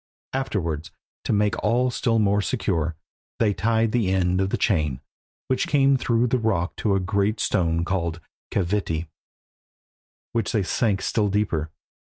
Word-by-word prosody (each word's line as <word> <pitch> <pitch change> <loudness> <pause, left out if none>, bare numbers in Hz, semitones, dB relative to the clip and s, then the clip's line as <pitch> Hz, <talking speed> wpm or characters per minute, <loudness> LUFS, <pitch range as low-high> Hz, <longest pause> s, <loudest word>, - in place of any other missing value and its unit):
Afterwards, 90 - -2 0.4
to - - 0
make 105 -1 +1
all 125 +4 +2
still 115 -1 +1
more 105 -1 +3
secure, 85 -9 -1 0.4
they 105 -3 +2
tied 115 +1 +1
the 110 -6 +1
end 90 0 +2
of 95 - 0
the - - 0
chain, 75 - +1 0.5
which 130 - 0
came 140 -1 +4
through 120 -2 +1
the 125 +1 +1
rock 95 -6 0
to 100 -3 +1
a - - +2
great 100 +3 0
stone 85 -3 +1
called 85 -3 -1 0.3
Keviti, 85 -4 -1 1.2
which 115 -5 -1
they 105 -4 +2
sank 100 0 0
still 105 -2 +1
deeper. 95 -6 0
100 Hz, 150 wpm, -24 LUFS, 90-115 Hz, 1.2 s, came